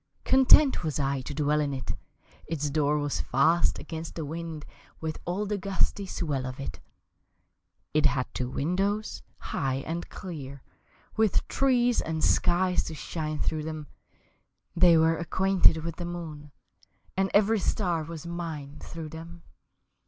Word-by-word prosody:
Content 265 -1 +6
was 155 -2 -1
I 135 -1 0
to 135 - -6
dwell 150 0 +2
in 145 -2 0
it 130 - -4 0.5
Its 150 -3 -2
door 150 0 +2
was 145 -1 -1
fast 160 +7 +3
against 160 0 -6
the 160 - -3
wind 160 0 -5 0.3
With 160 -1 -4
all 185 +4 -1
the 205 0 -2
gusty 195 +1 0
swell 145 -8 -2
of 130 +1 -7
it. 110 -10 -6 1.1
It 150 -1 +5
had 135 -3 0
two 125 -1 -2
windows, 195 +10 -1 0.2
high 135 0 -2
and 170 +2 -4
clear, 140 -7 -7 0.5
With 220 -2 +2
trees 245 -3 +3
and 160 -1 -2
skies 180 +1 +3
to 160 - -5
shine 155 0 -3
through 155 +1 -1
them, 155 -2 -5 0.9
They 170 -1 +7
were 160 0 +4
acquainted 180 -1 +3
with 165 -1 -4
the 175 - -4
moon, 160 -4 -6 0.6
And 190 +1 +1
every 215 +2 +4
star 180 -4 0
was 165 0 -8
mine 160 -4 -5
through 165 -2 -7
them. 165 +2 -10
160 Hz, 145 wpm, -28 LUFS, 150-180 Hz, 1.1 s, They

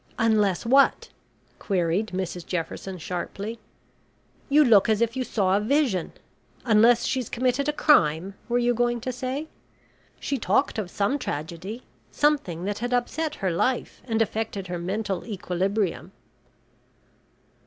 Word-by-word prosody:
"Unless 215 -3 +2
what?" 270 +4 +4 0.5
queried 185 +1 0
Mrs 185 -2 -4
Jefferson, 180 +2 -4
sharply. 195 +6 -5 0.9
"You 295 +1 +6
look 220 -3 +5
as 215 -1 +3
if 230 +1 0
you 260 - -1
saw 195 -6 +1
a - - +3
vision. 240 - +1 0.5
Unless 230 +1 +5
she's 255 -4 -1
committed 255 +4 0
a - - +3
crime, 190 - +3 0.2
were 240 - +2
you 245 0 +2
going 240 0 0
to 255 - -3
say? 260 +5 -4 0.7
She 275 - -2
talked 270 - +1
of 195 -4 -4
some 210 +11 0
tragedy 175 - -5 0.3
something 280 - +1
that 205 0 -2
had 245 +1 0
upset 300 +5 -2
her 185 - +2
life, 245 +10 -1
and 225 -2 +2
affected 215 -3 -4
her 175 -1 -4
mental 195 +1 -3
equilibrium." 190 - -2
220 Hz, 135 wpm, -25 LUFS, 185-245 Hz, 0.9 s, You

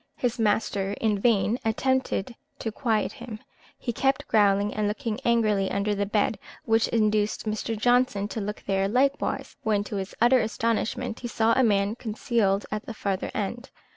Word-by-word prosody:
His 245 -1 -2
master 205 -2 +1
in 210 -1 0
vain 225 +1 +2
attempted 255 0 0 0.2
to 225 - -4
quiet 220 -2 0
him, 220 -3 -8 0.4
he 240 - -3
kept 270 +4 0
growling 205 -1 +3
and 210 0 0
looking 220 +1 -3
angrily 215 -5 +2
under 200 +1 0
the 200 0 -1
bed, 210 +1 +1 0.3
which 225 0 +3
induced 215 -2 +1
Mr. 215 +1 -2
Johnson 245 -3 +2
to 220 - -4
look 210 +1 -5
there 195 0 +1
likewise, 270 +6 0
when, 210 -2 +1
to 205 0 -5
his 190 0 -5
utter 240 +2 +5
astonishment, 230 +1 -1
he 245 - -5
saw 230 -1 +2
a 260 - +3
man 200 -2 +2
concealed 215 -3 0
at 210 0 -4
the 230 - -6
farther 195 -2 -2
end. 235 +5 -3
215 Hz, 170 wpm, -26 LUFS, 205-235 Hz, 0.4 s, utter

